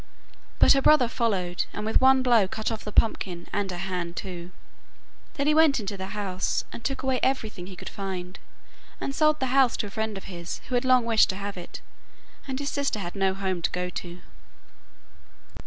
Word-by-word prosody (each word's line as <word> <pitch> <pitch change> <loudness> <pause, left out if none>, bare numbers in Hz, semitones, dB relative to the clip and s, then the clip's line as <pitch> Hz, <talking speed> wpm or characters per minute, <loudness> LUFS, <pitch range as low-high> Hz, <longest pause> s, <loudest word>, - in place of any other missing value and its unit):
But - - +7
her 275 - +2
brother 270 -3 +5
followed, 195 -7 -1
and 210 - -4
with 220 - +2
one 265 0 +5
blow 235 -6 +4
cut 220 +4 -3
off 220 - -5
the 210 - -6
pumpkin 185 -6 +1
and 205 -1 -1
her 180 - -4
hand 180 -2 -3
too. 175 -2 -6 0.9
Then 280 - -1
he 300 - +4
went 310 -4 +5
into 200 -1 -4
the 190 +2 -6
house 190 -3 -1
and 230 - -8
took 270 +3 -2
away 260 -1 +1
everything 220 -8 -1
he 190 - -9
could - - -10
find, 185 -2 -5 0.6
and 275 - -3
sold 305 +1 +3
the 260 -1 -1
house 265 -3 +4
to - - -2
a - - -6
friend 220 -1 -3
of 195 - -8
his 170 -3 -6
who - - -5
had 245 +1 +1
long 255 -2 +4
wished 225 -2 +4
to 185 - -1
have 200 +1 -5
it, 175 - -9 0.7
and 265 -1 -3
his 285 +1 -2
sister 280 -6 -1
had 175 -4 -5
no 190 -1 +1
home 190 -2 -2
to - - +1
go 180 0 -3
to. 175 0 -7
210 Hz, 205 wpm, -26 LUFS, 185-255 Hz, 0.9 s, But